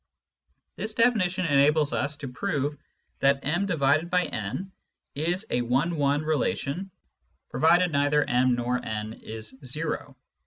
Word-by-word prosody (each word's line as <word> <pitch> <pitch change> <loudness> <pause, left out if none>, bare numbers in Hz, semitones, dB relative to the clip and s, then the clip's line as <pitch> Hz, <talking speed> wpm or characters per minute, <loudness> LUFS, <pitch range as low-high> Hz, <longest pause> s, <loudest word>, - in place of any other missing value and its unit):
This 215 0 -2
definition 205 -7 +2
enables 150 0 +3
us 145 +1 0
to 140 -1 -6
prove 145 +1 -2 0.4
that 140 0 +3
m/n 165 - 0 0.4
is 175 +7 -1
a 125 - +1
one 135 +8 +1
one 145 0 +1
relation, 155 +3 -1 0.6
provided 175 +2 +4
neither 145 0 +2
m 125 0 +2
or 125 +1 -1
n 110 0 -4
is 110 0 -8
zero. 150 +5 -4
145 Hz, 115 wpm, -26 LUFS, 130-175 Hz, 0.6 s, provided